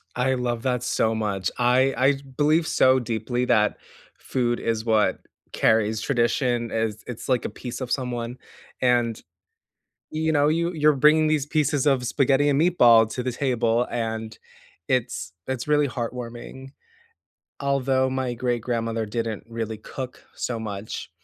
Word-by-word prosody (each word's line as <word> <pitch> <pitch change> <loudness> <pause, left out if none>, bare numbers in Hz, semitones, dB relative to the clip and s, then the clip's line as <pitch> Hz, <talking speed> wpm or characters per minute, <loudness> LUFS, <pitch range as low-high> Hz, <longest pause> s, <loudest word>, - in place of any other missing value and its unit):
I 125 +2 +1
love 120 -2 -2
that 125 -2 0
so 115 -2 +1
much. 100 -4 -2
I 130 +2 +3
I 130 +3 +4 0.2
believe 155 +2 +3
so 130 0 +4
deeply 120 +1 -2
that 110 -4 +2 0.4
food 120 -2 -1
is 115 -1 -1
what 110 -2 +2 0.3
carries 110 -1 +2
tradition, 120 -1 0
as 110 -1 -2
it's 125 +1 -7
like 125 -3 +1
a - - -1
piece 120 +4 -7
of 125 - -4
someone, 125 -2 -2 0.4
and, 120 -3 +2 0.9
you 160 0 0
know, 145 -1 +3
you 170 +2 +1
you're 150 -1 +4
bringing 155 +3 +5
these 155 -3 +1
pieces 150 -2 0
of 130 -3 +2
spaghetti 140 +2 +2
and 140 +1 +2
meatball 120 -10 +5
to 125 - -3
the 125 0 -2
table, 120 -2 +1
and 110 -2 -4 0.5
it's 125 -8 -1
it's 130 +1 -4
really 150 -1 +3
heartwarming. 120 +1 -6 0.9
Although 135 -1 +1
my 130 -1 -2
great 120 -1 -1
grandmother 115 -2 -2
didn't 115 0 -3
really 115 -1 -4
cook 130 +4 -8
so 120 -2 -3
much, 105 -1 -6
125 Hz, 145 wpm, -24 LUFS, 115-135 Hz, 0.9 s, bringing